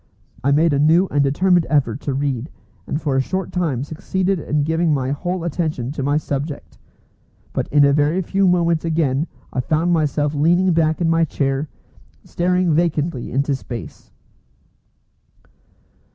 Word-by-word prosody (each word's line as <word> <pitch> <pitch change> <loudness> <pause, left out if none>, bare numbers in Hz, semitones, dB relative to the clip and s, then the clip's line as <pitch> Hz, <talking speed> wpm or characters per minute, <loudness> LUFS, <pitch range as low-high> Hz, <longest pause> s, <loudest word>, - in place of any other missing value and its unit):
I 140 - +2
made 155 +2 +3
a 140 - +1
new 160 +5 +4
and 145 -1 +2
determined 175 +5 +2
effort 135 -4 +1
to 140 - -3
read, 135 -1 -2 0.4
and 145 - -2
for 145 -5 -1
a 135 - +3
short 190 +6 -3
time 155 -9 -1
succeeded 185 +5 -2
in 150 -1 -1
giving 160 +2 +1
my 130 -1 -2
whole 175 +4 -3
attention 155 -7 -2
to 145 - -5
my 145 +2 +1
subject. 140 - -5 0.7
But - - -2
in 145 -1 +4
a 140 - +4
very 150 +5 +2
few 195 +3 +1
moments 170 -2 +2
again 160 -2 0 0.3
I - - -1
found 160 +7 +1
myself 150 -2 0
leaning 175 +5 +3
back 160 0 +1
in 170 - +2
my 165 0 +3
chair, 140 -1 -1 0.5
staring 180 -1 0
vacantly 155 -4 -1
into 140 +2 0
space. 125 -3 -8
155 Hz, 155 wpm, -20 LUFS, 140-170 Hz, 0.7 s, new